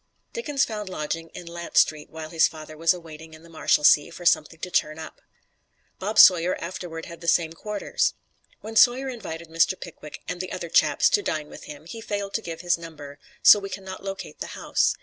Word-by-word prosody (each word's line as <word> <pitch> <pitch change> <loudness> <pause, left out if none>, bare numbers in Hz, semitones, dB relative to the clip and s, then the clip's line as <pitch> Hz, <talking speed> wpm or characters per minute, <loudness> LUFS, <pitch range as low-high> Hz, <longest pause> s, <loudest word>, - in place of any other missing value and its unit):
Dickens 295 - 0
found 210 -3 -5
lodgings 165 -1 -4
in 175 - -8
Lant 170 0 -6
Street 155 -1 +3
while 160 -1 -8
his 165 -2 +4
father 155 -1 -10
was 165 +1 +3
awaiting 160 -3 -7
in 155 - -17
the 170 - -16
Marshalsea 150 -1 +4
for 175 +1 -10
something 160 -1 +2
to 180 - -5
turn 155 -2 +1
up. 160 -1 -10 0.8
Bob 210 +3 -3
Sawyer 180 -2 +7
afterward 170 -2 -6
had 170 -1 -11
the 170 - -8
same 165 -1 +2
quarters. 210 +4 -2 0.5
When 220 +1 -8
Sawyer 255 +4 +5
invited 170 -9 -7
Mr. 165 +3 +2
Pickwick 155 -3 -10
"and 180 0 -3
the 185 - -6
other 175 -2 -5
chaps" - - +4
to 410 - +3
dine 155 - -3
with - - -11
him, 150 +1 -10
he 225 +7 -8
failed 205 -2 -4
to 225 - -1
give 165 -4 -7
his 175 -1 +1
number, 150 -4 -10 0.2
so 210 - +9
we 195 -1 -6
can 195 - -7
not 190 0 -8
locate 195 0 -7
the - - -4
house. - - +1
170 Hz, 210 wpm, -25 LUFS, 160-195 Hz, 0.8 s, so